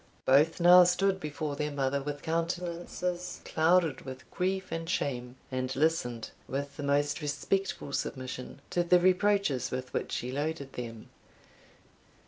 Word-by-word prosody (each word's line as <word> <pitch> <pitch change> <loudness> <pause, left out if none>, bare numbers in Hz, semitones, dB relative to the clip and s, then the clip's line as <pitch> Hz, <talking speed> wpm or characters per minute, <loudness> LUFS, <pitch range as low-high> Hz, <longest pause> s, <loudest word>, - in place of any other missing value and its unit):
Both 150 +6 +4
now 180 +1 +9
stood 190 +2 +2
before 150 -2 -4
their 150 +1 -1
mother 140 -1 0
with 145 0 -5
countenances 175 +2 -2
clouded 160 -3 +2
with 130 -1 -9
grief 190 +1 -1
and 165 0 -3
shame, 125 -7 -2 0.2
and 130 0 -2
listened, 135 -6 0 0.2
with 140 +1 -4
the - - -6
most 145 +1 +1
respectful 150 +2 -2
submission, 130 +1 -4
to 175 - +2
the 180 +1 +5
reproaches 185 - +2
with 130 0 -5
which - - -2
she 125 - -3
loaded 145 0 -3
them. 115 -2 -7
150 Hz, 135 wpm, -30 LUFS, 135-175 Hz, 0.2 s, now